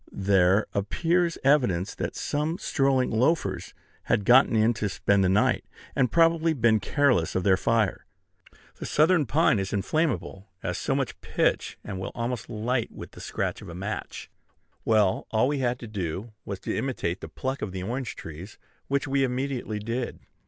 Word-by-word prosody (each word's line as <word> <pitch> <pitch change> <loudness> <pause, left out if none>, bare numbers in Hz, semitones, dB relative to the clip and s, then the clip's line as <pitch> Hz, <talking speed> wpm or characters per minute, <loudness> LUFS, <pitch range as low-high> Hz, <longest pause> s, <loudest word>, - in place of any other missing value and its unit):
There 95 0 +3
appears 170 - +1
evidence 125 - +2
that - - -4
some 150 +3 -1
strolling 135 -5 +1
loafers 110 - 0 0.3
had 100 - +1
gotten 125 0 +6
in 110 +2 +4
to 105 -2 -2
spend 100 +1 +2
the 90 - +3
night, 100 +3 +2 0.3
and 125 -3 +2
probably 165 -1 +4
been 115 -5 +3
careless 125 - +1
of 95 - +1
their 95 -1 +5
fire. 110 +1 0 0.7
The - - -6
southern 155 -1 +3
pine 140 -5 +3
is 95 -1 -3
inflammable 105 - -1 0.2
as - - -2
so - - 0
much - - -3
pitch, - - 0
and 95 -2 -5
will 95 - -4
almost 120 -2 -3
light 120 +2 -1
with - - -10
the - - -12
scratch - - -3
of - - -10
a 85 - -8
match. 100 +4 -5 0.6
Well, 105 -4 +2
all 110 +3 +2
we 145 0 -1
had 125 -1 0
to 120 - -7
do 100 +1 -4
was 100 -2 -5
to - - -3
imitate 110 -8 -2
the - - -7
pluck 130 +1 -4
of 105 - -3
the 95 -1 -5
orange 120 +3 -3
trees, 80 +6 -9 0.3
which 140 +1 0
we 135 0 +2
immediately 130 -3 -2
did. 115 +4 -4
115 Hz, 175 wpm, -26 LUFS, 100-135 Hz, 0.7 s, gotten